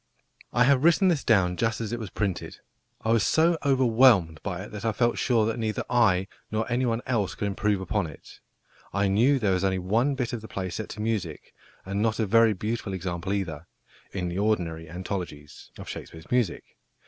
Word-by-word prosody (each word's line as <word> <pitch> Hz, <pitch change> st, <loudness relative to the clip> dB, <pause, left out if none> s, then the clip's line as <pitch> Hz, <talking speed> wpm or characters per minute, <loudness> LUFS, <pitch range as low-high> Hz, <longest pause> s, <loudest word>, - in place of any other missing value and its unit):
I 120 Hz, -, +4 dB
have 135 Hz, +1 st, +4 dB
written 175 Hz, +3 st, +5 dB
this 160 Hz, -6 st, +1 dB
down 95 Hz, -6 st, +3 dB
just 115 Hz, -1 st, 0 dB
as 115 Hz, 0 st, -4 dB
it 120 Hz, -, -2 dB
was 110 Hz, -4 st, -6 dB
printed. 100 Hz, -1 st, -3 dB, 0.5 s
I 110 Hz, -, +2 dB
was 115 Hz, -1 st, +4 dB
so 165 Hz, +2 st, +3 dB
overwhelmed 120 Hz, -, +4 dB
by 95 Hz, -2 st, -4 dB
it 105 Hz, -, -10 dB
that 105 Hz, 0 st, -7 dB
I 115 Hz, -1 st, 0 dB
felt 120 Hz, +2 st, +1 dB
sure 115 Hz, -4 st, +2 dB
that 115 Hz, +1 st, -2 dB
neither 110 Hz, -1 st, -1 dB
I 95 Hz, -6 st, +3 dB, 0.2 s
nor 110 Hz, +1 st, -1 dB
anyone 120 Hz, -1 st, 0 dB
else 105 Hz, -8 st, -1 dB
could -, -, -3 dB
improve 100 Hz, 0 st, 0 dB
upon 95 Hz, 0 st, -1 dB
it. 75 Hz, -, -13 dB, 0.5 s
I 100 Hz, +1 st, +2 dB
knew 120 Hz, +9 st, +3 dB
there 105 Hz, -6 st, +1 dB
was 90 Hz, +1 st, 0 dB
only 95 Hz, -1 st, +1 dB
one 115 Hz, +10 st, +1 dB
bit 125 Hz, -3 st, -2 dB
of 120 Hz, -, -3 dB
the 110 Hz, -, -9 dB
play 95 Hz, -3 st, -4 dB
set 110 Hz, +4 st, -5 dB
to -, -, -4 dB
music 105 Hz, -8 st, -3 dB, 0.3 s
and 100 Hz, +2 st, -2 dB
not 110 Hz, -1 st, +1 dB
a 110 Hz, -, +1 dB
very 115 Hz, +2 st, +5 dB
beautiful 105 Hz, +1 st, -3 dB
example 90 Hz, +1 st, -4 dB
either 85 Hz, -5 st, -3 dB, 0.4 s
in 90 Hz, -3 st, -3 dB
the 90 Hz, +2 st, -3 dB
ordinary 85 Hz, -7 st, -1 dB
anthologies 85 Hz, -4 st, -6 dB
of -, -, -9 dB
Shakespeare's 80 Hz, +1 st, -9 dB
music. 120 Hz, -8 st, +1 dB
105 Hz, 200 wpm, -26 LUFS, 95-115 Hz, 0.5 s, written